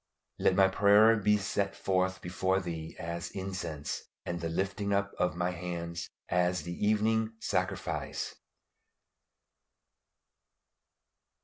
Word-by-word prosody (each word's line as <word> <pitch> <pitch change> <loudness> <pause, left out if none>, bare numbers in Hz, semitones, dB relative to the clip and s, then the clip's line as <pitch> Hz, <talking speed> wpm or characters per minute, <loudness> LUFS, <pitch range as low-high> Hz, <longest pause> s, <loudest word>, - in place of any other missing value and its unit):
"LET 95 - +3
MY 95 0 +6
PRAYER 105 +3 +6
BE 105 0 +3
SET 100 0 -1
FORTH 95 0 0
BEFORE 95 +2 +1
THEE 80 -3 -6
AS 85 0 -4
INCENSE: 90 -6 -4 0.2
AND 85 -1 -3
THE 85 - -2
LIFTING 100 +4 -1
UP 100 0 0
OF 90 -2 +1
MY 90 +1 0
HANDS 85 -1 -4 0.2
AS 90 -1 +1
THE 85 +2 -4
EVENING 110 +1 +2
SACRIFICE." - - -2
95 Hz, 110 wpm, -31 LUFS, 85-100 Hz, 0.2 s, MY